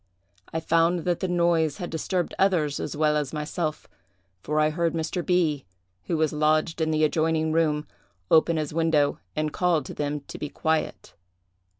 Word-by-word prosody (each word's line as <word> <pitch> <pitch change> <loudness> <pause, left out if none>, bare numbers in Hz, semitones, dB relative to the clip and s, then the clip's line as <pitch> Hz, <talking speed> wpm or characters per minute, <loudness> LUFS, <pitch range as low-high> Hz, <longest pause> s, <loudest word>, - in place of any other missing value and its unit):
I 160 - -1
found 165 +2 +2
that 175 0 -1
the 190 - -1
noise 170 -4 +2
had 175 - -5
disturbed 175 +2 -2
others 165 -7 +2
as 150 - -4
well 150 0 +2
as 150 -2 -2
myself, 155 +1 -3 0.5
for 150 +7 -1
I 155 0 +3
heard 170 +1 0
Mr. 165 +2 -2
B——, 165 -6 +1 0.4
who 165 - -1
was 155 -1 +1
lodged 155 +2 +1
in 160 - +1
the 155 0 +1
adjoining 160 0 +1
room, 155 -2 +1 0.4
open 160 +1 +4
his 150 -1 -3
window 160 -3 +2 0.2
and 155 0 -1
call 175 -5 +1
to - - -8
them 145 0 -3
to - - -10
be 150 - -4
quiet. 160 +1 -2
160 Hz, 175 wpm, -25 LUFS, 150-170 Hz, 0.5 s, open